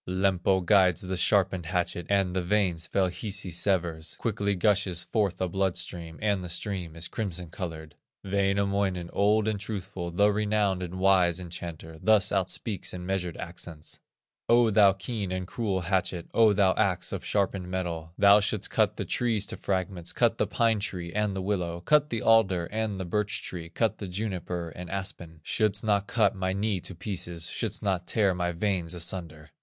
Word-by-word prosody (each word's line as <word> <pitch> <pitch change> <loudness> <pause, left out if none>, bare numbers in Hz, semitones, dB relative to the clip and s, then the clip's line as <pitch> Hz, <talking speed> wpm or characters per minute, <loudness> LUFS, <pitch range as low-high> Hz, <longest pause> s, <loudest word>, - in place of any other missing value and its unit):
Lempo 95 0 +2
guides 95 -2 +4
the 95 0 -3
sharpened 95 -2 +2
hatchet, 85 -1 -1
And 95 -2 +2
the 95 - +1
veins 90 -3 +1
fell 95 -2 +1
Hisi 95 +1 -4
severs. 85 -3 -1
Quickly 100 -3 -1
gushes 95 -2 +2
forth 105 -5 0
a 95 - 0
blood 95 0 0
stream, 85 -2 -5
And 100 -3 +1
the 90 - -6
stream 85 -2 -4
is 85 +1 -4
crimson 90 -6 -4
colored. 80 -5 -6 0.3
Wainamoinen, 100 -2 0
old 105 +1 +3
and 105 -2 0
truthful, 95 -3 -5
The 100 +5 +3
renowned 105 -2 +1
and 90 0 -5
wise 95 -2 +3
enchanter, 85 -2 -7
Thus 110 -3 +4
outspeaks 95 +1 -1
in 90 0 -6
measured 90 -3 -2
accents: 85 -2 -7 0.5
"O 120 -1 +5
thou 100 -2 +6
keen 100 0 -4
and 95 0 -2
cruel 100 -2 -2
hatchet, 90 -1 -1
O 115 -2 +6
thou 100 -2 +4
axe 90 -4 0
of 95 - -4
sharpened 95 -3 -1
metal, 85 -3 -3
Thou 100 +1 +7
shouldst 105 0 -1
cut - - +2
the - - -3
trees 115 -4 0
to - - -5
fragments, 95 -2 -2
Cut - - +2
the - - +2
pine 115 -2 +2
tree 90 -5 -4
and 105 -2 0
the 95 - -3
willow, 90 -4 -1
Cut 150 +10 +3
the 115 -2 -2
alder 95 -6 +4
and 110 -2 -2
the 95 - -3
birch 105 +3 -1
tree, 85 -2 -6
Cut 110 +5 0
the 100 - -5
juniper 90 -3 -3
and 90 +2 -9
aspen, 90 -5 -5
Shouldst 110 +2 +1
not 100 -2 +1
cut 115 -1 +2
my 95 -1 -1
knee 100 0 0
to 95 - -7
pieces, 85 -3 -3
Shouldst 110 -2 -3
not 95 -3 -1
tear 100 -4 +2
my 90 -1 -1
veins 90 -1 -1
asunder." 85 -3 -4
95 Hz, 180 wpm, -28 LUFS, 90-100 Hz, 0.5 s, Thou